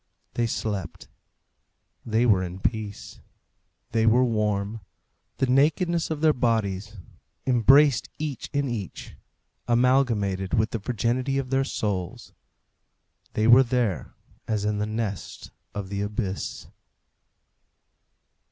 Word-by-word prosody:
They 120 -1 0
slept. 100 -6 -4 0.9
They 115 +1 +1
were 100 -6 +4
in 90 +1 -6
peace. 105 0 -4 0.7
They 115 0 +2
were 120 +3 +5
warm. 105 -2 -1 0.6
The - - +2
nakedness 160 +6 +2
of 155 -2 -3
their 155 -1 +5
bodies, 110 -4 -1 0.5
embraced 135 +1 +5
each 150 -4 -4
in 140 0 0
each, 110 -7 -6 0.5
amalgamated 120 -6 +2
with 110 +1 +1
the 115 - -2
virginity 125 +5 -1
of 135 -1 -3
their 135 0 +3
souls. 100 -9 -3 1.0
They 110 - +1
were 120 +3 +8
there 120 - -1 0.3
as 105 -2 -1
in 105 -1 0
the 105 - -1
nest 110 -4 -5 0.2
of 100 -2 -4
the 100 0 -3
abyss. 100 -2 -3
115 Hz, 115 wpm, -25 LUFS, 100-130 Hz, 1.0 s, were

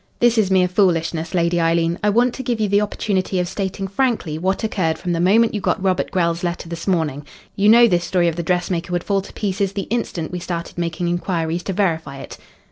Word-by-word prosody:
"This 240 -1 +4
is 200 -3 +2
mere 185 -1 +4
foolishness, 170 -3 0
Lady 170 0 +2
Eileen. 165 +1 +1
I 210 - +2
want 240 +4 +3
to - - -5
give 240 -3 -2
you 215 - +1
the 200 +1 +3
opportunity 195 -2 -1
of 180 - 0
stating 195 +1 -3
frankly 195 - -1
what 190 +5 -1
occurred 180 -7 0
from 180 - -4
the 165 - -1
moment 215 +6 +4
you 210 - -2
got - - 0
Robert 185 -1 0
Grell's 170 -1 0
letter 175 -1 -3
this 170 +2 -7
morning. 160 -6 0 0.3
You 205 +1 +3
know 235 +2 +8
this 175 -5 +1
story 175 0 +1
of 165 - 0
the 170 - -2
dressmaker 175 0 -1
would 175 0 -1
fall 200 -1 0
to - - -12
pieces 200 -1 -2
the 200 -1 -3
instant 180 -9 -2
we 180 - -4
started 170 0 -5
making 170 0 -2
inquiries 170 -1 -1
to 195 - -2
verify 165 -7 -1
it." - - -10
180 Hz, 225 wpm, -20 LUFS, 170-200 Hz, 0.3 s, know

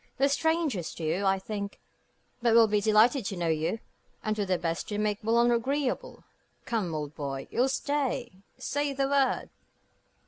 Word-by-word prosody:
They're 275 +1 +3
strangers 300 - 0
to 165 - -7
you, 175 +6 0
I 195 0 +3
think; 200 +1 -5 0.6
but 235 -1 +3
will 230 -1 +8
be 210 -1 +1
delighted 220 +5 +4
to 195 - -4
know 170 -1 0
you, 160 +6 0 0.5
and 215 -1 0
do 210 -1 -1
their 185 -1 +2
best 165 -1 -2
to 205 - -3
make 210 0 0
Boulogne 235 +2 +3
agreeable. 270 - -1 0.4
Come, 205 -9 -1
old 150 -1 -4
boy. 135 -3 -5
You'll 255 +3 +2
stay? 270 -2 -1 0.3
Say 285 0 -1
the 275 0 0
word." 275 -1 +1
220 Hz, 170 wpm, -28 LUFS, 190-270 Hz, 0.6 s, will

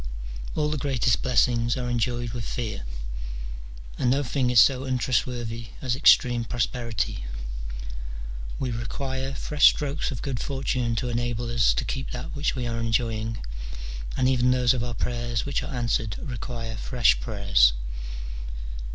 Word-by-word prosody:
[AH 150 -1 +2
the 155 - -1
greatest 130 -3 +2
blessings 120 -1 +3
are 125 -1 -2
enjoyed 120 0 0
with 120 0 -4
fear, 110 - -3 1.1
and 125 - +3
no 140 +3 +3
thing 130 0 +1
is 125 -2 +6
so 130 +4 +6
untrustworthy 120 -3 -1
as 125 -3 0
extreme 125 -3 +6
prosperity: 115 - -1 1.3
we 130 -2 -1
require 130 +3 -3
fresh 150 +1 +5
strokes 145 +1 -1
of 130 -6 -5
good 135 -4 -2
fortune 130 -3 -1
to 125 +2 -1
enable 120 0 -1
us 115 -2 +4
to - - -1
keep 130 0 -3
that 125 +3 -5
which 145 0 0
we 125 -2 -2
are 115 -1 -2
enjoying, 115 - -1 0.7
and 130 - +3
even 125 -1 +3
those 125 -1 +4
of 120 -2 -1
our 120 -1 -3
prayers 120 -1 -1
which 140 - 0
are - - -5
answered 115 -3 0
require 115 -2 -5
fresh 120 +1 +3
prayers. 100 - +4
120 Hz, 145 wpm, -26 LUFS, 115-130 Hz, 1.3 s, is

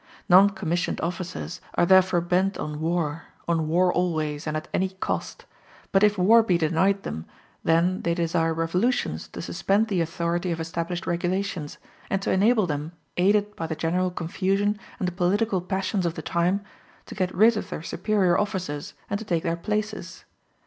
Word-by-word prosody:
Non 190 +3 +7
commissioned 175 -3 -2
officers 175 0 -4
are - - +4
therefore 185 -1 +5
bent 185 +3 +1
on 150 0 -4
war 165 -2 -1 0.2
on 165 -2 +1
war 180 +3 +3
always, 155 -4 -1
and 155 0 -1
at 155 - -6
any 190 +1 +1
cost; 190 0 -4 0.5
but 195 - +4
if 210 0 +4
war 220 +6 +6
be 185 -6 +2
denied 170 +5 +1
them, 80 +2 -5 0.4
then 170 +3 +2
they 170 0 0
desire 165 -1 +1
revolutions 180 +10 0
to - - -8
suspend 210 +3 +1
the 185 -4 +1
authority 170 +2 -1
of 165 - -2
established 170 +2 -3
regulations, 175 -2 -2 0.3
and 195 - +1
to - - 0
enable 215 +2 +4
them, 150 0 -3 0.2
aided 205 +3 +2
by 165 - -4
the 160 - -3
general 180 +4 0
confusion 195 +4 -1 0.2
and 185 - -1
the - - -1
political 190 +2 +1
passions 190 0 -1
of 165 - -3
the - - -6
time, 180 +4 +1 0.4
to - - -9
get 185 -2 -2
rid 220 +5 +6
of 210 - -4
their - - -5
superior 190 0 +1
officers 185 -8 -3
and 200 - -2
to - - -6
take 170 -5 0
their 165 -1 0
places. 210 0 -4
180 Hz, 175 wpm, -25 LUFS, 165-195 Hz, 0.5 s, Non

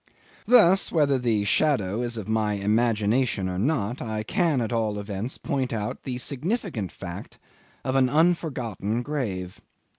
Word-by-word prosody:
'Thus, 195 -6 +6
whether 145 -5 +2
the 115 -4 +1
shadow 105 -3 +1
is 120 -1 -3
of 105 - -5
my 110 -1 +1
imagination 105 +1 +1
or 90 0 -3
not, 120 -1 0
I 110 -2 -3
can 165 - +1
at 115 0 -2
all 110 -3 0
events 105 +4 -4
point 130 -2 -2
out 105 -2 -3
the 125 -2 -4
significant 145 - -2
fact 85 -2 -8 0.5
of 130 - -1
an 130 -1 +4
unforgotten 130 - 0
grave. 100 -11 -4
120 Hz, 145 wpm, -25 LUFS, 105-140 Hz, 0.5 s, Thus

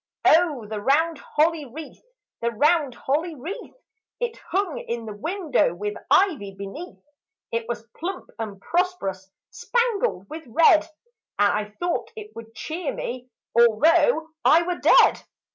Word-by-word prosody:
O 310 -8 +4
the 210 0 -5
round 315 +6 +2
holly 315 +1 +1
wreath, 290 +4 -10 0.4
the 235 - +1
round 290 +3 +2
holly 310 +7 -1
wreath! 365 - -7 0.4
It 480 -1 -2
hung 380 -4 -1
In 235 -1 -5
the 215 - -6
window 310 - 0
with 205 +3 -3 0.2
ivy 290 - +2
beneath. 245 - -8 0.5
It 230 0 -2
was 235 -1 -4
plump 360 +3 -5
and 210 -3 -5
prosperous, 195 - -2 0.2
spangled 465 - 0
with 315 +2 -9
red 315 +5 +5 0.5
And 205 0 +4
I 210 0 -2
thought 350 0 -1
it 430 -1 -10
would 225 0 -11
cheer 320 +4 -4
me 250 +1 -5 0.3
although 315 - +4
I 335 +2 +6
were 355 0 -3
dead. - - +5
305 Hz, 140 wpm, -24 LUFS, 225-350 Hz, 0.5 s, I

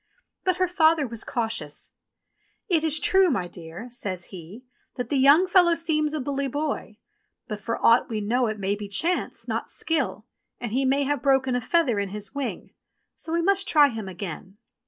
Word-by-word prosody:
But 370 -2 +2
her 370 0 +1
father 320 -3 +3
was 230 -3 -5
cautious. 225 -11 -3 0.8
"It 335 -6 +2
is 315 -1 +4
true, 380 +3 +4
my 195 - -1
dear," 170 +2 -9
I - - -9
says 190 -7 -4
he, 190 +8 -10 0.3
"that 245 - -4
the 290 - 0
young 280 +7 +6
fellow 355 -2 +4
seems 305 -2 0
a - - -2
bully 280 0 -2
boy; 285 -6 -3 0.5
but 210 -2 -5
for 230 +3 -3
aught 230 +2 +5
we 220 -2 -2
know 235 +4 +1
it 215 0 -3
may 195 0 -1
be 205 0 -7
chance, 335 - -1
not - - -3
skill, 250 - -2 0.3
and 240 -3 -5
he 265 +4 +1
may 275 +2 +2
have 290 0 0
a - - -25
broken 265 -2 +2
feather 255 -4 +1
in 200 -1 -2
his 205 +2 -6
wing. 280 -2 -5 0.4
So 320 - -7
we 335 0 +1
must 390 +1 +2
try 295 -2 +5
him 220 -5 -6
again." 190 +1 -7
260 Hz, 195 wpm, -25 LUFS, 210-315 Hz, 0.8 s, young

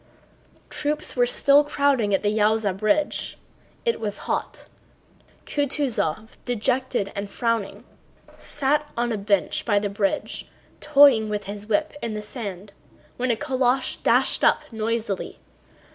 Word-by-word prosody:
Troops 300 0 -2
were 245 -1 +3
still 280 +4 +4
crowding 280 -7 +1
at 195 - +1
the 210 +1 +1
Yaúza 215 -2 +2
bridge. 215 +9 0 0.5
It 465 - +1
was 210 -2 -2
hot. - - -3 0.8
Kutúzov, 255 - -1
dejected 245 -2 -1
and 200 0 -4
frowning, 230 -2 -2 0.5
sat 295 +1 -1
on 240 0 0
a 220 - -1
bench 200 -1 0
by 205 -3 +2
the 205 0 0
bridge 200 0 -2 0.3
toying 275 -7 +5
with 210 -1 -2
his 205 +1 -8
whip 310 +8 0
in 225 -2 -3
the 210 - -4
sand 205 -4 -7 0.4
when 255 +1 -1
a 235 - +3
calèche 260 0 0
dashed - - +3
up - - +4
noisily. 220 -2 -2
225 Hz, 130 wpm, -24 LUFS, 205-270 Hz, 0.8 s, toying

